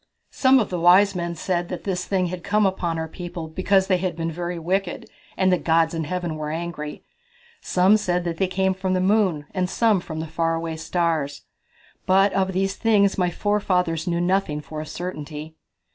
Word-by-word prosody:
"Some 265 0 +4
of 220 -7 0
the 180 - -2
wise 185 +4 +6
men 170 -2 -3
said 175 +1 -2
that 180 - -5
this 180 -2 -2
thing 190 -2 0
had 180 -1 -6
come 210 +1 +2
upon 180 -3 -1
our 160 0 -3
people 175 -1 -7
because 190 +4 +2
they 185 -1 +2
had 180 -2 -2
been 165 0 -3
very 175 +1 -4
wicked, 180 +2 -2 0.3
and 185 -1 +3
the 180 - +2
gods 165 0 +2
in 165 -1 -2
Heaven 175 -1 -3
were 150 -1 -4
angry. 155 -2 -5 0.6
Some 185 +4 +4
said 180 -4 -1
they 175 +2 -1
came 190 +1 +1
from 190 0 -2
the - - +1
moon, 185 -6 +2
and 185 -2 -1
some 220 -3 +2
from 160 -2 -7
the 160 - -3
far 165 +1 -1
away 165 -1 -4
stars. 160 -4 -1 0.6
But 195 +2 +4
of 190 -1 +1
these 195 +1 -1
things 205 -4 +2
my 180 -1 +2
forefathers 180 -4 0
knew 170 -1 0
nothing 180 -4 0
for 155 +1 -7
a 155 - -7
certainty." 155 -2 -6
180 Hz, 195 wpm, -23 LUFS, 165-190 Hz, 0.6 s, wise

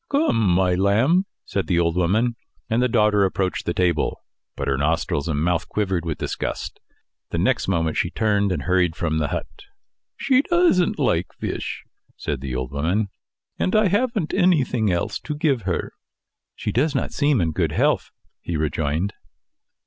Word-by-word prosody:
"Come, 285 - +2
my 90 +1 +3
lamb," 115 - +3 0.2
said 95 -4 -2
the 90 - +1
old 85 -1 +2
woman; 105 +7 +1 0.4
and 115 +2 +2
the 125 - +3
daughter 105 -3 +3
approached 95 -1 -1
the 85 - +1
table. 85 -4 0 0.3
But 70 - -4
her 70 - +2
nostrils 75 0 0
and 75 -3 -1
mouth 85 -1 0
quivered 95 -5 -1
with 80 -2 -2
disgust. - - -4 0.5
The - - -3
next 115 +8 +1
moment 80 -4 0
she 85 - +1
turned 100 -1 +1
and 90 - -2
hurried 90 -3 +2
from 80 -4 -1
the 75 - 0
hut. - - -3 0.7
"She 265 -1 +3
doesn't 345 - +2
like 90 - +1
fish," - - -4 0.3
said 70 -3 -3
the 65 -2 -4
old 65 0 -3
woman, 90 +9 0 0.5
"and 185 - +1
I 215 -2 +4
haven't 210 -3 0
anything 130 - +2
else 85 -1 -1
to 150 - -5
give 145 -5 +1
her." 85 - -2 0.6
"She 105 - -3
does 140 +7 +1
not 135 - -1
seem 145 -3 +2
in 80 -3 +1
good - - 0
health," - - +1 0.3
he 85 - -3
rejoined. 80 +4 -1
95 Hz, 170 wpm, -23 LUFS, 85-130 Hz, 0.7 s, I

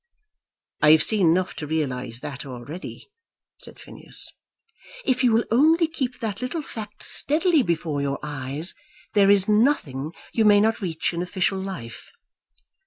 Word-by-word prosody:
"I 150 - +6
have 160 - +5
seen 205 -6 +2
enough 185 +3 +1
to 150 - -5
realise 130 -6 -3
that 140 -2 -6
already," 140 - -9 0.5
said - - -11
Phineas. - - -4 0.7
"If 260 0 +1
you 245 - +4
will 225 +1 +3
only 320 +7 +4
keep 265 -6 -4
that 220 -1 -3
little 285 +6 -3
fact 215 -5 -8
steadily 315 +2 +3
before 165 - -1
your 140 0 -1
eyes, 145 +3 -4 0.4
there 200 -1 +5
is 200 -1 +5
nothing 185 - +1 0.2
you 225 - +2
may 205 -1 +6
not 220 +2 +1
reach 170 -3 -2
in 170 - -2
official 185 +2 -1
life. 185 -13 -7
190 Hz, 150 wpm, -24 LUFS, 150-230 Hz, 0.7 s, I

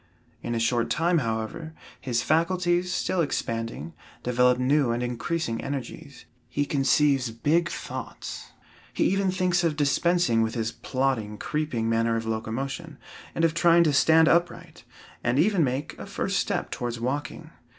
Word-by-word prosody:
In 120 0 -3
a - - 0
short 115 0 +1
time, 170 +6 +2
however, 115 +7 -4 0.2
his 120 -3 -1
faculties, 175 +2 +1
still 180 0 0
expanding, 115 - -3 0.3
develop 125 0 +3
new 135 +1 +2
and 120 +1 -1
increasing 125 +1 -2
energies. 140 +1 -6 0.2
He 145 +4 -1
conceives 140 -2 +2
"big 155 +9 +1
thoughts." - - -7 0.5
He - - +2
even 195 0 +2
thinks 185 -1 +1
of 165 -3 +1
dispensing 145 -3 +2
with 110 +1 -1
his 115 -1 -1
plodding, 130 -6 -2
creeping 150 -7 -2
manner 115 0 +1
of 115 0 -2
locomotion, 135 +8 -4 0.4
and 165 - +2
of 165 - +1
trying 170 0 +5
to 155 -3 +2
stand 160 +3 +5
upright, 170 +1 0 0.4
and 125 +2 +1
even 185 +1 +3
make 135 +2 -2
a - - -7
first - - -1
step - - -2
towards 120 -1 -4
walking. 145 +6 -4
140 Hz, 150 wpm, -26 LUFS, 115-165 Hz, 0.5 s, trying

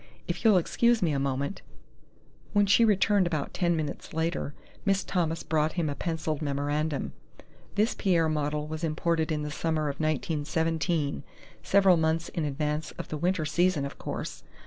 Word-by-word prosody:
If 175 +4 -3
you'll 215 -4 +6
excuse 235 +5 +2
me 165 - +2
a 140 - 0
moment 140 +5 -2 0.5
" - - -30
When 205 -1 +4
she 200 +4 +5
returned 205 -3 +4
about 155 -4 -2
ten 170 -1 +1
minutes 155 -1 -4
later, 160 -3 -1 0.3
Miss 195 -1 +2
Thomas 165 -3 -1
brought 155 -1 +1
him 165 -5 0
a - - -1
pencilled 160 -2 -2
memorandum. 145 +1 -1 0.6
"This 210 +3 +2
Pierre 170 -5 +2
model 150 -1 -1
was 155 +2 -6
imported 160 0 0
in 150 -1 -1
the 150 - -4
summer 155 -1 -1
of 140 - -5
1917, 155 0 0 0.4
several 195 -3 +5
months 160 +1 +1
in 165 - -2
advance 150 +1 -2
of - - -7
the 155 - -3
winter 175 0 0
season, 175 -2 +2
of 140 - -8
course. - - -5
160 Hz, 170 wpm, -28 LUFS, 150-175 Hz, 0.6 s, you'll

